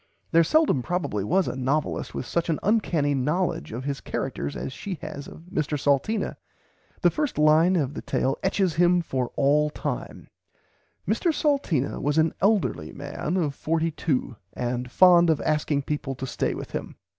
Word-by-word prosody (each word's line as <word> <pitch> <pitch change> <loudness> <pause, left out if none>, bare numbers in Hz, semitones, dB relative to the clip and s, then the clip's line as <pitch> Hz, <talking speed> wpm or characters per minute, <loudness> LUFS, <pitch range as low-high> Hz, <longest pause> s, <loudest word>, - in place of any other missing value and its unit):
There 165 0 +6
seldom 310 - +3
probably 140 - -2
was 185 - +2
a - - -3
novelist 135 +4 -1
with - - -3
such 170 +5 -1
an 160 - +1
uncanny 175 -9 +2
knowledge 150 +7 -1
of 120 +4 -5
his 140 0 -3
characters 70 0 -4
as 130 - -5
she 190 +3 -5
has 150 -3 -6
of - - -11
Mr 150 -1 -1
Salteena. 145 +11 0 0.7
The - - +5
first 300 -3 -2
line 155 +4 +5
of 145 -5 0
the - - -5
tale 135 +1 0
etches 190 -2 +1
him 175 0 +4
for 130 -5 -2
all 150 +2 +3
time: - - -5 0.8
"Mr 345 - +2
Salteena 280 - 0
was 145 +2 0
an 160 0 +3
elderly 195 - +1
man 145 +5 -4
of 155 -6 0
42 160 -6 -1 0.2
and 125 0 -3
fond 175 +3 +6
of 160 - +3
asking 150 -2 0
people 140 -2 -3
to 130 - -5
stay - - -2
with - - -7
him." - - -5
150 Hz, 170 wpm, -25 LUFS, 135-175 Hz, 0.8 s, There